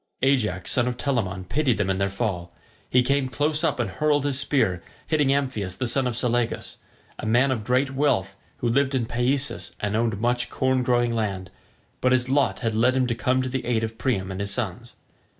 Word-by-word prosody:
Ajax 105 -10 +1
son 125 -1 +2
of 125 -1 -2
Telamon 100 -10 -1
pitied 135 +1 +1
them 105 - 0
in 95 - -1
their 100 0 +1
fall; 95 -4 -3 0.4
he 125 0 +4
came 140 +1 +1
close 150 +4 +1
up 150 -5 +1
and 120 - +1
hurled 145 +3 +1
his 140 -2 +2
spear, 115 - +1 0.2
hitting 150 -3 +1
Amphius 130 -9 -1
the 130 - -1
son 130 +2 +1
of 120 -2 -2
Selagus, 120 -1 -1 0.4
a - - -5
man 125 +5 +3
of 115 -5 -2
great 130 +4 +1
wealth 100 -9 +1 0.2
who 120 - -2
lived 135 +3 +2
in 125 -3 0
Paesus 120 -4 -1
and 105 0 -1
owned 110 -3 0
much 120 +1 0
corn 130 0 +1
growing 120 -1 +2
land, 95 -5 -2 0.5
but 130 0 +3
his 130 0 +1
lot 140 -1 +1
had 115 -2 0
led 125 +4 +3
him 130 -1 +2
to 120 - 0
come 130 +2 +1
to 130 - -3
the 130 0 -3
aid 115 -2 0
of 110 +1 -4
Priam 95 -7 -1
and 95 - -5
his 100 - -2
sons. 120 +2 -4
120 Hz, 210 wpm, -24 LUFS, 110-130 Hz, 0.5 s, he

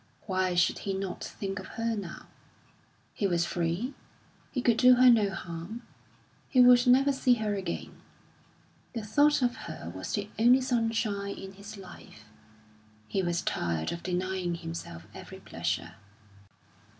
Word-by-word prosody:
Why 185 -2 0
should 175 0 +2
he 195 -1 -3
not 190 -1 -4
think 195 -1 -5
of 190 - -8
her 230 0 0
now? 195 -5 -7 0.9
He 200 - 0
was 175 -2 +1
free; 175 +10 -2 0.6
he 270 - -2
could 235 -2 +3
do 250 0 +7
her 250 0 +7
no 215 -4 +4
harm; 180 +5 -7 0.7
he 260 - +2
would 245 0 +7
never 270 +3 +5
see 255 -2 +3
her 215 -2 -1
again. 195 -2 -5 0.9
The 230 -3 -4
thought 290 +6 +3
of 245 -1 +1
her 85 - -7
was 95 - -5
the 205 -1 -1
only 245 +3 +6
sunshine 225 -5 -1
in 195 0 -8
his 200 +2 -10
life; 175 - -13 0.8
he 190 - 0
was 175 0 -1
tired 85 - -1
of 170 - -5
denying 185 -1 -2
himself 165 - -7
every - - -10
pleasure. 85 +1 -3
200 Hz, 150 wpm, -29 LUFS, 175-240 Hz, 0.9 s, do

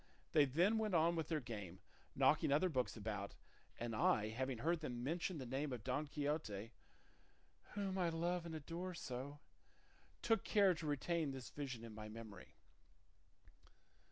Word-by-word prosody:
They 150 -2 +6
then 175 - +3
went 215 -4 +1
on 165 +1 +4
with 160 -2 -1
their 160 -2 +1
game, 105 - -6 0.4
knocking - - +4
other 155 +6 +4
books 130 -6 0
about; 105 -2 -3 0.4
and 115 -1 -2
I, 105 0 +3
having 130 +3 -2
heard 165 +8 +1
them 125 -6 -4
mention 170 +5 -1
the 135 - -4
name 135 +4 -1
of 120 -4 -4
Don 135 +5 0
Quixote 140 -8 -2 1.0
whom 195 -2 -1
I 175 -2 +3
love 170 +1 0
and 160 - -4
adore 170 +4 -4
so, 135 -1 -5 0.9
took 225 - +3
care 200 -3 +5
to 160 -2 -5
retain 155 +2 +1
this 135 -2 -6
vision 130 -5 -4
in 115 -1 -7
my 105 0 -7
memory." 110 -4 -9
145 Hz, 155 wpm, -41 LUFS, 120-170 Hz, 1.0 s, They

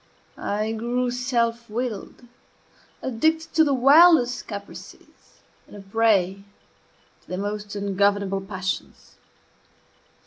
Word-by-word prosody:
I 215 +2 -2
grew 240 +2 -1
self 235 -2 -1
willed, 235 0 -5 0.8
addicted 315 +7 0
to 320 - +5
the 285 -3 +1
wildest 275 -1 +5
caprices, 200 -2 -11 0.3
and - - -14
a - - -9
prey 195 -2 +1 0.8
to - - -31
the 185 - -5
most 205 +1 -5
ungovernable 200 0 0
passions. 190 -1 -6
225 Hz, 100 wpm, -24 LUFS, 200-250 Hz, 0.8 s, to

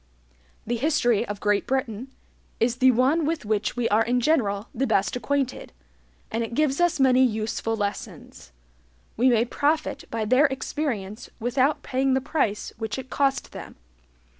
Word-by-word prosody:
The 240 +2 -1
history 240 -5 +1
of 205 -1 -5
Great 205 0 +1
Britain 255 -2 -2 0.5
is 235 +1 +1
the 260 0 +5
one 260 +7 +3
with 310 -4 -2
which 215 +1 -1
we 240 -1 +1
are 220 +2 +3
in 245 +2 +1
general 225 -7 +1
the 265 +2 -1
best 195 - +1
acquainted, 260 - -2 0.6
and 230 +1 -1
it 230 +1 -5
gives 300 +1 +1
us 350 -3 +2
many 260 -1 +5
useful 225 -1 -1
lessons. 200 - -6 0.6
We 255 +3 +3
may 235 -1 +3
profit 290 +2 -1
by 225 -1 -2
their 255 +7 +4
experience 250 -6 -4
without 260 +5 +1
paying 265 0 +1
the - - +2
price 265 -7 -2
which 220 +1 -3
it 260 -1 -8
cost 275 -1 0
them. - - -9
250 Hz, 160 wpm, -25 LUFS, 220-275 Hz, 0.6 s, the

